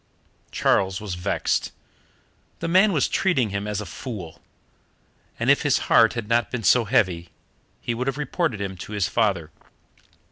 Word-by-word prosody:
Charles 95 0 +1
was 105 -4 -5
vexed. 90 0 -1 0.9
The - - -4
man 190 +5 +5
was 150 -7 +2
treating 135 - +1
him 100 +1 -3
as 105 -1 -2
a - - -6
fool, 95 -4 -8 1.0
and - - +3
if - - +3
his - - +2
heart 115 -1 +6
had 115 -3 -4
not 120 +1 +1
been 125 -3 -4
so 115 +6 +4
heavy 90 -7 +1 0.5
he 120 - -2
would 125 +3 -3
have 135 0 -1
reported 150 - -1
him 100 -1 -4
to 105 - -8
his 100 -3 0
father. 95 -9 0
110 Hz, 165 wpm, -24 LUFS, 95-125 Hz, 1.0 s, heart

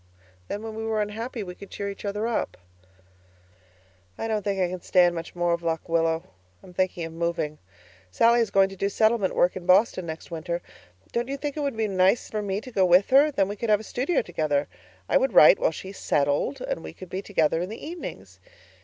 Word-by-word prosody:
Then 205 - -5
when 225 -1 -6
we 220 0 -5
were 220 -1 -1
unhappy 220 +2 -3
we 180 -2 -7
could 200 +2 -12
cheer 200 - -5
each 200 +1 -7
other 210 +2 -2
up. 235 - -2 1.6
I 225 - -3
don't 215 -1 0
think 200 -1 -2
I 185 - +2
can 180 0 -6
stand 175 -1 +4
much 165 0 -7
more 175 -1 +1
of 170 - -2
Lock 165 -1 -2
Willow. 165 0 +1 0.4
I'm 180 - -14
thinking 180 -2 -1
of 165 - -8
moving. 165 -2 -2 0.5
Sallie 235 - +4
is 230 -3 +1
going 195 -1 +4
to 195 - -9
do 195 +1 -1
settlement 220 -1 +2
work 180 - +3
in 185 -1 -7
Boston 185 -1 +4
next 160 +2 -7
winter. 170 +1 -4 0.5
Don't 240 +1 -1
you 275 +1 -3
think 290 0 -4
it - - -4
would 280 -5 -2
be 220 -1 +1
nice 190 +3 +2
for 215 - -2
me 200 -1 -2
to 255 - -10
go 195 -5 +2
with 180 +4 +4
her, 280 +3 +6
then 200 -10 +1
we 205 - -4
could 225 +2 -4
have 210 -1 +5
a - - -9
studio 265 +10 0
together? 150 -4 -1 0.4
I - - +4
would - - +1
write - - +8
while - - +3
she 190 - -8
SETTLED 145 - 0
and - - -3
we - - -8
could 185 - -11
be 190 - -3
together 165 -5 +1
in 180 - -3
the 220 - -8
evenings. 340 +2 -8
195 Hz, 225 wpm, -25 LUFS, 175-225 Hz, 1.6 s, write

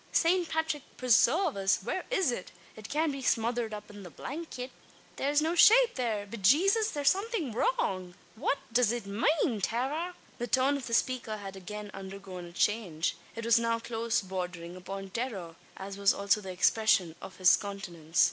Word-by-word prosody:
Saint 345 0 +2
Patrick 320 -2 -1 0.2
presarve 265 - +3
us, 195 -1 +1
whare 370 - -3
is 385 - +2
it? 185 -6 -5 0.2
It 215 -1 -10
cyan't 310 +1 +1
be 275 -1 -5
smothered 235 -2 0
up 210 0 -7
in 205 -1 -11
the 180 - -9
blankyet? 260 - -6 0.4
Thare's 290 +2 +1
no 325 +2 +1
shape 465 +7 +7
thare! 225 -5 -2
Be 205 +3 -8
Jaysus, 380 - +4
thare's 290 -2 +3
somethin' 390 - -2
wrong! 185 -6 -1 0.2
What 250 +5 0 0.2
does 240 -2 +4
it 240 -3 -3
mane, 225 +2 +1
Tara?" 290 - -1 0.2
The 240 - -2
tone 260 +4 +2
of 275 -2 -5
the 230 - +1
speaker 235 -3 0
had 195 -2 -8
again 205 +2 -7
undergone 190 -2 -8
a 170 - -11
change. 175 -5 0 0.2
It 230 0 -5
was 230 0 +5
now 230 0 +1
close 230 0 -1
bordering 180 -2 -5
upon 195 +1 -7
terror 195 -9 -4 0.2
as 195 +1 -7
was 200 0 +4
also 200 +1 +2
the 190 - -8
expression 185 -1 +3
of 190 - -9
his 185 -1 +6
countenance. 175 -5 -5
225 Hz, 175 wpm, -30 LUFS, 195-280 Hz, 0.4 s, shape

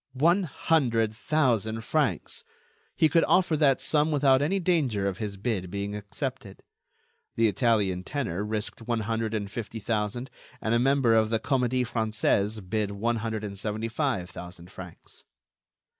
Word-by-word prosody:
One 170 +7 +4
hundred 120 -8 +1
thousand 115 -5 0
francs! 110 - -1 0.5
He 160 - +4
could 165 +2 +3
offer 180 -3 +3
that 140 -3 +4
sum 150 0 +2
without 140 -3 +4
any 185 +7 +1
danger 140 - +1
of 95 -1 -3
his 105 -2 -4
bid 95 -3 -2
being 100 +2 -4
accepted. 105 +1 -6 0.7
The 115 0 +4
Italian 105 -4 +1
tenor 105 - -3
risked 110 +1 -4
one 120 -2 0
hundred 110 0 -2
and 100 -2 -3
fifty 115 0 -5
thousand, 110 +4 -2 0.3
and 110 - -1
a 115 - +4
member 135 -2 +3
of 110 -1 +3
the 115 0 +1
Comédie 125 0 +1
Française 110 -3 0
bid 105 +1 0
one 115 +4 -1
hundred 110 -1 -3
and 100 -1 -5
seventy 110 +3 -3
five 115 - -1
thousand 90 0 -10
francs. 90 -2 -12
115 Hz, 155 wpm, -27 LUFS, 105-135 Hz, 0.7 s, One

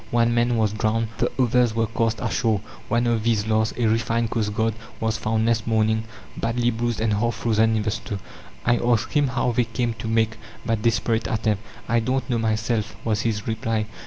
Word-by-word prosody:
One 120 0 +2
man 120 0 +2
was 110 -2 +2
drowned, 110 +1 0
the - - +1
others 125 -2 +3
were 115 0 +2
cast 115 0 -1
ashore. 110 -2 +1 0.3
One 120 +1 +1
of 115 -2 +1
these 110 -2 +1
last, 110 0 +1
a 120 - +1
refined 115 +1 +1
coastguard, 110 0 0 0.3
was 110 -1 0
found 110 +1 0
next 115 -1 +1
morning, 110 0 +2 0.3
badly 120 +1 0
bruised 120 0 -2
and 110 -1 +1
half 110 +2 +1
frozen 110 0 +2
in 110 - 0
the 105 - 0
snow. 105 -2 -4 0.5
I 120 0 +4
asked 120 -2 +1
him, 145 -2 +3
how 125 -1 0
they 120 +1 +2
came 115 +1 -1
to - - -4
make 110 0 +1 0.3
that 115 -3 0
desperate 110 -1 +1
attempt? 110 -2 0 0.3
"I 120 - +3
don't 130 +4 -1
know 120 - +1
myself," 110 -1 -1
was 110 -2 +1
his 105 -2 -1
reply." 110 -1 -1
115 Hz, 195 wpm, -24 LUFS, 110-115 Hz, 0.5 s, I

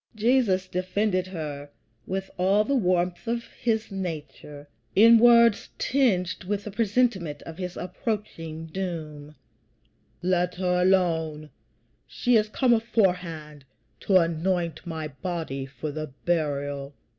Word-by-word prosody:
Jesus 215 -5 +2
defended 185 +1 -1
her 150 -5 -6 0.4
with 190 0 -3
all 195 +3 +4
the 280 - -1
warmth 180 -4 +1
of 235 0 -1 0.2
his 220 -3 0
nature, 155 -5 -6 0.3
in 230 +3 +8
words 235 -2 +5
tinged 190 -10 +1
with 205 +1 -2
the 210 - -6
presentiment 205 -7 0
of 165 +2 -10
his 180 -1 -5
approaching 175 -5 -4
doom: 155 -4 -6 0.9
"Let 180 -1 +1
her 180 -1 +1
alone; 160 -5 +1 0.6
she 245 -1 +1
is 215 -1 +3
come 250 +2 +3
aforehand 180 - 0 0.4
to 195 - +3
anoint 170 -1 0
my 160 -2 -4
body 150 -3 -5
for 140 +3 -6
the 155 +1 -4 0.2
burial." 145 -4 -1
180 Hz, 120 wpm, -26 LUFS, 160-210 Hz, 0.9 s, in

